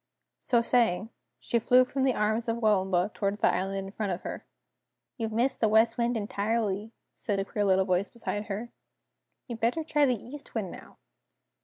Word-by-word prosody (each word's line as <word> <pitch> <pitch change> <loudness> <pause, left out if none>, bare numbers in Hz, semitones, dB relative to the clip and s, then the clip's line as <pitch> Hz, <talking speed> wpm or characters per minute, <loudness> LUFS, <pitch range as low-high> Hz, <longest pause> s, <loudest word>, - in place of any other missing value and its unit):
So 235 -2 +2
saying, 230 -3 +2 0.3
she 235 - 0
flew 250 +3 +5
from 270 +1 -1
the 260 - +2
arms 220 +3 0
of 230 0 0
Waomba 195 -4 +2
toward 200 0 -1
the - - +3
island 195 +1 -2
in 195 - -8
front 205 -1 -3
of 175 - -3
her. - - -6 0.7
"You've 225 -3 -3
missed 240 +4 0
the 220 - +3
West 225 +2 +4
Wind 235 0 +1
entirely," 210 0 -1 0.2
said 205 -3 -2
a 195 - -1
queer 205 0 -1
little 190 -1 +3
voice 185 +1 +1
beside 215 -3 -4
her. 220 +3 -5 0.8
"You'd 235 -3 -6
better 240 +9 +1
try 295 -2 +2
the 245 -4 +1
East 280 +7 -11
Wind, - - -2
now!" - - -12
220 Hz, 185 wpm, -28 LUFS, 200-235 Hz, 0.8 s, flew